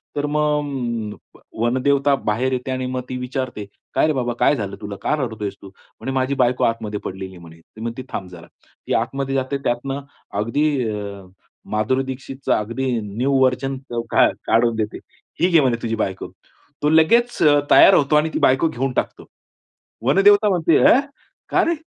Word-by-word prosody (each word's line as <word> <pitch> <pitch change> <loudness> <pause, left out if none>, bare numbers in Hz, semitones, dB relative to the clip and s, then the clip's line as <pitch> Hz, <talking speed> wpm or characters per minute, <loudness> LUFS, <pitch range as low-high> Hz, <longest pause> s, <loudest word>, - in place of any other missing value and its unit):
तर 145 0 -1
मग 135 -8 -1 0.2
अ, - - -17 0.2
वनदेवता 135 +4 +2
बाहेर 125 +5 0
येते 125 +1 -3
आणि 130 0 -2
मग 130 - -1
ती 130 - -4
विचारते. 125 -4 -4 0.3
"काय - - +3
रे 155 - +1
बाबा, 120 -3 -1
काय - - +4
झालं 100 -6 -4
तुला? 105 -1 -6
का - - +1
रडतोयस 110 -4 -4
तू?" 100 - -11
म्हणे 100 +6 -9
"माझी 130 +1 0
बायको 125 +1 +1
आतमध्ये 110 -2 -1
पडलेली 95 0 -6
आहे." - - -12
म्हणे. 80 -1 -14
ती 110 +6 -16
म्हणते 115 +2 -4
"थांब 95 - -5
जरा". 90 -2 -12 0.4
ती - - 0
आतमध्ये 135 +3 -1
जाते 135 +1 -1
त्यातनं 135 +3 -2 0.4
अगदी 145 +8 +1 0.2
अ, 100 -2 -6 0.5
माधुरी 110 +5 +1
दीक्षितचा 130 +1 -3
अगदी 120 +5 -3
न्यू 120 +7 -1
व्हर्जन 130 +1 +1 0.3
काय, - - +5
काढून 115 +1 +2
देते. 110 -1 -3 0.4
"ही 180 - +4
घे 165 -3 +5
म्हणे 125 -4 +1
तुझी 115 -1 -2
बायको". 95 -3 -3 0.5
तो 150 - +3
लगेच 230 +11 +3
अ, 145 -2 +6
तयार 195 - +8
होतो 145 -3 +3
आणि 150 +1 +3
ती - - -1
बायको 130 +5 +3
घेऊन 135 -1 -2
टाकतो. - - -3 0.8
वनदेवता 205 - +5
म्हणते 170 -4 +3
"अँ! 255 - +6 0.5
का - - +3
रे? 335 - +1
130 Hz, 175 wpm, -21 LUFS, 110-140 Hz, 0.8 s, तयार